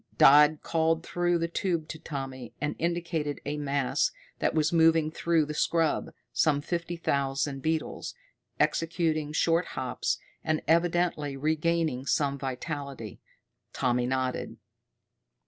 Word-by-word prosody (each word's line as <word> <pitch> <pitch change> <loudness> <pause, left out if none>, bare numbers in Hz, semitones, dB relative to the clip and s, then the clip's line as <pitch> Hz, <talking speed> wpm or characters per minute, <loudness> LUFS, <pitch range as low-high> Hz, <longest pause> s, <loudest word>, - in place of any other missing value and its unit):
Dodd 150 +2 +7
called 165 0 +1
through 175 0 +1
the 165 0 -1
tube 170 -2 -1
to 160 - -6
Tommy, 135 -5 -6
and 150 +1 -2
indicated 165 -4 -1
a 145 +1 -2
mass 140 -2 +1 0.3
that - - 0
was 155 +1 +2
moving 160 -1 +4
through 165 -1 +1
the 150 - -5
scrub 165 +1 +1 0.2
some 145 +3 +3
fifty 170 +3 -3
thousand 140 -2 -1
beetles, 160 - -2 0.4
executing 160 -2 +1
short 165 +3 +2
hops 130 -1 -1 0.3
and 155 0 +1
evidently 170 -3 +1
regaining 155 -2 0
some 140 +1 +1
vitality. 135 - -5 0.5
Tommy 125 -1 +1
nodded. 130 0 -2
155 Hz, 120 wpm, -28 LUFS, 140-165 Hz, 0.5 s, Dodd